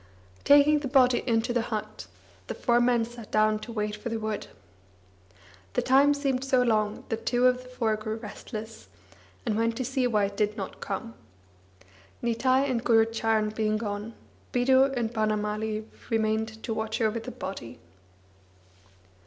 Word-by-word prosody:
Taking 290 +1 +6
the 290 - -4
body 255 -2 +4
into 230 0 +1
the 240 - +2
hut, 220 -2 -5 0.4
the - - -4
four 240 -1 +2
men 240 -1 +3
sat 235 -2 -11
down 215 0 +2
to 235 - -8
wait 210 -2 -2
for 215 +3 -6
the 230 - -2
wood. 215 -1 -3 1.3
The - - 0
time 280 +2 +5
seemed 270 -2 -1
so 260 -2 +3
long 215 -3 0
that 225 0 -3
two 245 +1 +2
of 250 0 +3
the 255 - -14
four 230 -4 0
grew 215 0 -4
restless, 220 0 -8 0.6
and 220 -3 0
went 230 +1 0
to 255 - -2
see 260 0 0
why 210 -4 +2
it 200 0 -5
did 210 +1 0
not 195 - -6
come. 225 +4 -4 1.1
Nitai 255 +3 +2
and 245 -3 -1
Gurucharan 225 -2 +2
being 215 0 0
gone, 210 +1 -5 0.4
Bidhu 260 +2 +4
and 235 -1 -1
Banamali 215 0 -1 0.2
remained 220 0 -1
to 225 - -2
watch 220 0 -3
over 225 0 +1
the 225 - -7
body. 125 -11 -7
225 Hz, 160 wpm, -27 LUFS, 215-245 Hz, 1.3 s, Taking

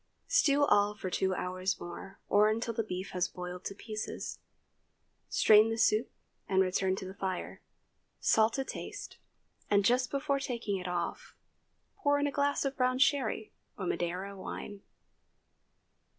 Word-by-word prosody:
Stew 290 -8 +4
all 205 -4 +3
for 190 -3 -5
two 190 0 +1
hours 185 +1 -2
more, 185 +2 -8
or 210 +1 +5
until 230 +1 -1
the 225 - 0
beef 185 -2 -5
has 180 -1 0
boiled 180 0 -7
to 200 - -4
pieces. 215 +1 -5 0.9
Strain 215 +1 +6
the 225 - -2
soup 225 +1 +3 0.4
and 190 -1 +3
return 185 0 +1
to 190 - -6
the 190 - -7
fire. 190 -2 -4 0.6
Salt 220 +1 +4
to 270 - -1
taste, - - -7 0.5
and 205 -1 +4
just 250 +2 +3
before 280 0 0
taking 235 -7 -2
it 180 -1 -5
off, 175 -1 -3 0.6
pour 285 -7 +2
in 285 - +1
a 285 - 0
glass 285 0 +1
of 275 0 -1
brown 255 0 +2
sherry 260 -6 +1 0.3
or 190 - -4
Madeira 180 +3 -2
wine. 200 +1 -7
210 Hz, 150 wpm, -31 LUFS, 190-255 Hz, 0.9 s, Strain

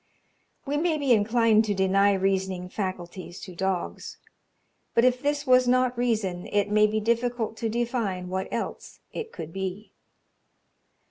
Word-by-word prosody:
We 290 +1 -1
may 320 0 +1
be 280 -4 +3
inclined 225 0 +4
to 205 -2 -1
deny 195 +1 +3
reasoning 190 -1 -1
faculties 185 -2 -5
to 185 - -9
dogs; 190 0 -3 0.8
but 235 - +5
if 250 0 +2
this 290 0 -1
was 255 -1 +5
not 250 0 +3
reason, 215 -7 -1
it 205 0 0
may 215 0 +5
be 215 +1 0
difficult 235 0 0
to 225 - -2
define 225 -6 -2
what 190 +1 -3
else - - -5
it 455 -1 -5
could 160 0 -8
be. 190 +2 -5
215 Hz, 145 wpm, -26 LUFS, 190-245 Hz, 0.8 s, but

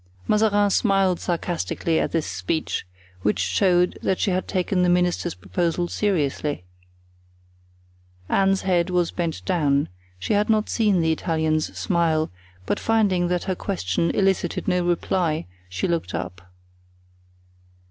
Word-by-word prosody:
Mazarin 205 -1 +3
smiled 195 -4 +2
sarcastically 170 -1 -1
at - - -1
this 165 -2 0
speech, 95 - -3 0.3
which 105 +2 +1
showed 175 - +2
that 190 - 0
she 200 - +1
had 185 +1 -1
taken 185 -1 0
the 180 - +3
minister's 175 -1 +1
proposal 175 0 -1
seriously. 150 - -1 1.6
Anne's 195 0 +2
head 180 -2 +2
was 180 -2 +1
bent 170 -3 -3
down—she 140 - -1
had 205 +1 +2
not 215 -1 +2
seen 210 -6 +2
the 160 0 +2
Italian's 160 -1 -1
smile; 165 -4 +1 0.3
but - - -1
finding 200 -6 +2
that 180 0 -1
her 190 - -1
question 170 - -1
elicited 190 -3 0
no 180 -1 +2
reply 175 -2 0 0.2
she 90 0 -2
looked 170 -2 -2
up. 90 0 -6
175 Hz, 125 wpm, -23 LUFS, 155-190 Hz, 1.6 s, Mazarin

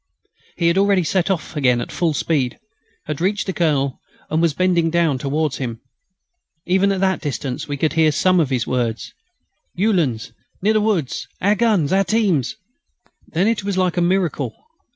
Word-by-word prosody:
He 170 - +1
had 170 +3 +3
already 200 -2 +3
set 175 +3 0
off 180 -4 -2
again 125 -4 +2
at - - -5
full 165 -4 0
speed, 135 -5 0 0.5
had 150 0 -4
reached 205 +3 0
the 190 - -3
Colonel, 140 -6 0 0.3
and 160 +1 +1
was 165 -4 +2
bending 175 -2 +2
down 165 -5 +1
towards 145 +1 -1
him. 120 -4 -4 0.9
Even 190 +2 +2
at 190 -1 -1
that 190 -1 +1
distance 135 -3 -4
we 145 -1 -3
could 155 +1 0
hear 160 -2 +4
some 185 +4 +3
of 155 -5 +1
his 125 -4 0
words: 120 -3 -2 0.6
"Uhlans... 170 - 0 0.3
near 210 +4 +2
the 215 - +2
woods,... 195 - -1
our 200 +3 +3
guns, 205 -8 +2
our 195 +1 +4
teams...." 195 - +1 0.7
Then 180 +5 0
it 225 -3 0
was 200 -1 -2
like 185 -2 +1
a 175 - +1
miracle. 170 - 0
170 Hz, 175 wpm, -20 LUFS, 140-190 Hz, 0.9 s, hear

